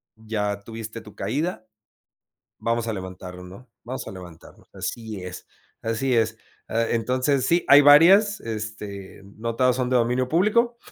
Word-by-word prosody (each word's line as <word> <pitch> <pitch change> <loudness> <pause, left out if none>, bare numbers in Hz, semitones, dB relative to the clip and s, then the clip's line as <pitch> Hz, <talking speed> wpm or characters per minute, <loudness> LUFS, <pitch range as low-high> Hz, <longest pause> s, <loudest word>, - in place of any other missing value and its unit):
ya 105 -2 -3
tuviste 115 +1 -8
tu 105 -2 -14
caída, 110 - -3 0.9
vamos 115 0 -1
a 110 - -1
levantarlo, 90 -1 -8
¿no?, 100 +8 -13
vamos 130 +2 -6
a - - -7
levantarnos. 90 -3 -13
Así 110 -4 -5
es 90 0 -8 0.4
así 115 +3 0
es, 110 -1 +1 0.3
ah, 115 +1 0
entonces, 130 +3 +1
sí, 170 +5 +2
hay 140 +1 +9
varias, 185 +9 +6
este, 105 -4 -7
no 115 +3 -6
todas 125 -1 +3
son 125 -1 -1
de 130 - +3
dominio 125 +2 +1
público, 235 - +2
115 Hz, 150 wpm, -24 LUFS, 105-130 Hz, 0.9 s, hay